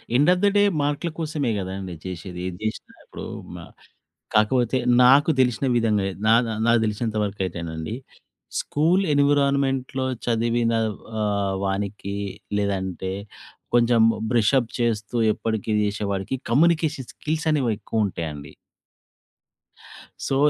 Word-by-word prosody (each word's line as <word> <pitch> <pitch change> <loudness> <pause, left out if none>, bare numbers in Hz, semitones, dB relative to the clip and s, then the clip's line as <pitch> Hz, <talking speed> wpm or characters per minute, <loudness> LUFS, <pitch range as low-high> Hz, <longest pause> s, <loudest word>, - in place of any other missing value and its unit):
End 145 +6 +4
of 180 - -2
the - - +6
day 205 - +5 0.2
మార్కుల 145 +4 -1
కోసమే 150 -6 -1
కదండీ 95 -1 -5
చేసేది. 90 0 -6
ఏది 90 -1 -6
చేసినా 110 - -5
ఇప్పుడు - - -8 0.3
మ - - -7 0.8
కాకపోతే 120 +4 +3 0.3
నాకు 140 +5 +6
తెలిసిన 125 +1 +2
విధంగా, 110 -4 +2 0.2
నా 110 - +6 0.3
నాకు 115 0 +5
తెలిసినంత 110 +1 -2
వరకు 100 -1 -4
అయితేనండి, 85 +2 -5 0.6
స్కూల్ 170 +6 +2
ఎన్విరాన్‌మెంట్‌లో 140 -2 +1 0.2
చదివిన 115 0 +1 0.5
ఆహ్, 100 -2 0
వానికి, 100 0 -3 0.4
లేదంటే 95 -2 -2 0.6
కొంచెం 120 -1 +4 0.3
బ్రషప్ 120 +1 +3
చేస్తూ, 115 -2 -1 0.2
ఎప్పటికీ 110 -1 -3
చేసేవాడికి 100 +3 -2
కమ్యూనికేషన్ 155 -1 +2
స్కిల్స్ 160 +1 -3
అనేవి 135 -6 +1
ఎక్కువుంటాయండి. 85 -10 -3 1.8
సో, 135 - 0
115 Hz, 110 wpm, -23 LUFS, 100-135 Hz, 1.8 s, the